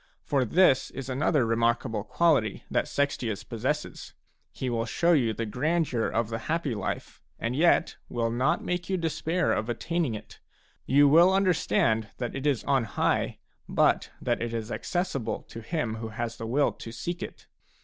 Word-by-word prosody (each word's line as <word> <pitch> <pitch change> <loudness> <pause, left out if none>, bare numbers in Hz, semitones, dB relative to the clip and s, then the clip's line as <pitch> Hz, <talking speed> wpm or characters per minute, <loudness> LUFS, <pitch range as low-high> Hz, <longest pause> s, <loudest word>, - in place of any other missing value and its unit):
For 135 -3 +1
this 155 - +4
is 135 -1 -7
another 135 0 +2
remarkable 115 -1 +1
quality 135 -5 +2
that - - +1
Sextius 125 -7 -1
possesses: 130 +6 -3 0.4
he 130 - -4
will 115 -1 -1
show 170 +9 +2
you 125 -8 +3
the 115 +1 -3
grandeur 135 +1 0
of 115 -1 -1
the 115 0 -3
happy 160 -5 0
life 105 -3 -4 0.2
and 115 +2 -2
yet 170 +4 +3
will 115 -1 -1
not 130 +6 +1
make 180 0 -2
you 190 - +1
despair 165 +1 0
of 110 +2 -2
attaining 155 +1 -1
it; 105 - -11 0.5
you 145 +2 +6
will 170 +6 +7
understand 175 - +2
that 120 -2 -4
it 135 +2 -2
is 140 -5 +1
on 135 -4 +2
high, 105 - 0 0.3
but - - +2
that 120 -2 -1
it 115 0 -2
is 115 0 -4
accessible 175 -9 -2
to 115 - -10
him 115 -4 -2
who 110 0 -5
has 115 +1 -4
the 115 - -5
will 140 +5 +2
to 115 - -9
seek 175 +9 -4
it. - - -8
130 Hz, 170 wpm, -27 LUFS, 115-155 Hz, 0.5 s, will